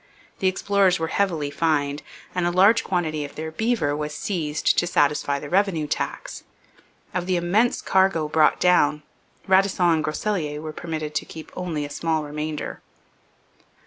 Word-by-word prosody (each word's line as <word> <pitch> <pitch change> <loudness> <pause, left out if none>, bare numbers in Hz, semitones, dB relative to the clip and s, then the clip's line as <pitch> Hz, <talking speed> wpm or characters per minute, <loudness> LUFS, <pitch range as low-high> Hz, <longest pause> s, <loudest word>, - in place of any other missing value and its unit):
The 190 - +1
explorers 195 -1 +2
were 160 0 -2
heavily 165 -8 0
fined, 145 -2 0 0.3
and 180 -1 0
a - - +1
large 200 +6 +5
quantity 160 -5 -1
of 145 - -9
their 160 +1 -5
beaver 220 -6 0
was 150 0 -4
seized 155 -6 0
to 175 - 0
satisfy 145 -3 +1
the 145 - -7
revenue 180 -3 +1
tax. 145 - -4 0.7
Of 180 -1 -2
the 185 - +1
immense 200 +8 +1
cargo 190 -5 +2
brought 155 0 +3
down, 150 -4 +3 0.4
Radisson 190 -1 +3
and 160 -1 +1
Groseilliers 155 -1 -2
were 155 -1 -6
permitted 155 -2 -5
to 150 - -2
keep 160 -1 -10
only 165 -5 -3
a - - -7
small 160 0 -1
remainder. 150 +1 -5
160 Hz, 155 wpm, -23 LUFS, 150-185 Hz, 0.7 s, large